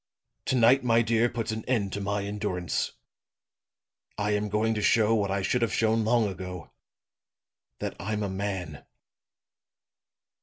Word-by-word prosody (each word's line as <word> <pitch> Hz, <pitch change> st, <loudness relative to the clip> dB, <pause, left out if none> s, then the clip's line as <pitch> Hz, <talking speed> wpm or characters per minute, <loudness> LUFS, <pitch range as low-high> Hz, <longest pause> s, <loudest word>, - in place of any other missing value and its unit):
To 130 Hz, -, +1 dB
night, 125 Hz, +2 st, +5 dB
my 115 Hz, -1 st, +4 dB
dear, 115 Hz, +1 st, +2 dB
puts 115 Hz, -2 st, -3 dB
an 110 Hz, 0 st, -4 dB
end 105 Hz, -7 st, 0 dB
to 100 Hz, -, -3 dB
my 100 Hz, 0 st, -1 dB
endurance. 100 Hz, -4 st, -2 dB, 1.2 s
I 105 Hz, 0 st, 0 dB
am 105 Hz, 0 st, 0 dB
going 110 Hz, +2 st, +1 dB
to 105 Hz, -, -2 dB
show 110 Hz, +1 st, +4 dB
what 105 Hz, -3 st, +1 dB
I 100 Hz, 0 st, -1 dB
should 125 Hz, +5 st, +1 dB
have 115 Hz, -, +1 dB
shown 110 Hz, 0 st, +2 dB
long 115 Hz, 0 st, +3 dB
ago 90 Hz, -3 st, -6 dB, 1.1 s
that -, -, -5 dB
I'm 105 Hz, +1 st, -2 dB
a -, -, -1 dB
man.' 95 Hz, -6 st, -4 dB
105 Hz, 150 wpm, -27 LUFS, 100-115 Hz, 1.2 s, night